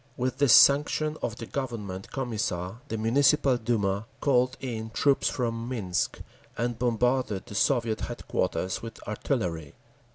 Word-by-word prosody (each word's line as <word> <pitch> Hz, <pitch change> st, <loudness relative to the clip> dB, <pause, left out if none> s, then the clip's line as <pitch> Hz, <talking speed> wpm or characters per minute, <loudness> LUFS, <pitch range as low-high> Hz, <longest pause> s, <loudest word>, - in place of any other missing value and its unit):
With 130 Hz, +1 st, -2 dB
the 140 Hz, -2 st, +3 dB
sanction 150 Hz, +4 st, +5 dB
of 115 Hz, -, -2 dB
the 115 Hz, -, -7 dB
Government 110 Hz, -8 st, -5 dB
Commissar 110 Hz, -6 st, -3 dB
the 115 Hz, -, -3 dB
Municipal 130 Hz, +4 st, +3 dB
Duma 110 Hz, -3 st, -1 dB
called 125 Hz, -2 st, +2 dB
in 110 Hz, -4 st, -4 dB
troops 140 Hz, +4 st, +2 dB
from 115 Hz, -1 st, -2 dB
Minsk, 100 Hz, -8 st, -2 dB, 0.4 s
and 120 Hz, 0 st, -2 dB
bombarded 120 Hz, -3 st, 0 dB
the -, -, -10 dB
Soviet 115 Hz, 0 st, +1 dB
headquarters 95 Hz, -, -2 dB
with 115 Hz, -1 st, -8 dB
artillery. 90 Hz, -, -2 dB
115 Hz, 130 wpm, -27 LUFS, 105-130 Hz, 0.4 s, sanction